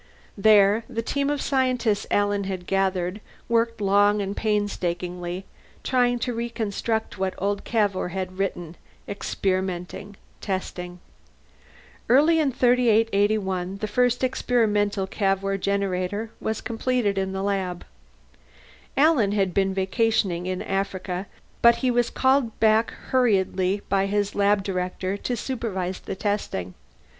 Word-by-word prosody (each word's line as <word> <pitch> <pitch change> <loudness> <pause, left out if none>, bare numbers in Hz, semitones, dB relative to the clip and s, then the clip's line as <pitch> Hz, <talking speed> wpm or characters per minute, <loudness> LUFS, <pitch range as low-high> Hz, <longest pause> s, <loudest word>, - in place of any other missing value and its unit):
There, 210 +1 +5
the 230 -2 -3
team 280 +4 -1
of 290 -1 -1
scientists 255 -6 +1
Alan 205 -1 +1
had 190 -2 -4
gathered 190 0 0 0.3
worked 230 -1 +1
long 205 +1 +3
and 200 0 -3
painstakingly, 180 -4 -2 0.4
trying 245 -2 +2
to 245 - -1
reconstruct 225 -2 -3
what 190 -1 -1
old 200 +1 -1
Cavour 205 -6 0
had 185 +1 -5
written, 175 -4 -3 0.3
experimenting, 190 0 -3 0.3
testing. 180 -2 -4 1.1
Early 305 +7 +5
in 295 -3 +2
3881 215 -6 +2
the 215 - -3
first 245 +3 +1
experimental 210 -6 +1
Cavour 195 0 0
Generator 200 +2 -1
was 220 0 -3
completed 230 -4 0
in 190 0 -2
the 190 0 -3
lab. 190 -3 -2 1.1
Alan 275 -9 +4
had 195 -3 +1
been 195 0 +2
vacationing 190 -2 0
in 185 0 -2
Africa, 195 -1 -3 0.3
but 235 0 +7
he 250 - +3
was 240 -1 +2
called 260 -3 +1
back 220 +1 +4 0.2
hurriedly 200 -5 +2
by 195 0 +1
his 205 0 0
lab 205 0 +2
director 185 0 -2
to 245 +4 -3
supervise 200 -7 -3
the - - -6
testing. 190 - -2
200 Hz, 120 wpm, -24 LUFS, 190-230 Hz, 1.1 s, but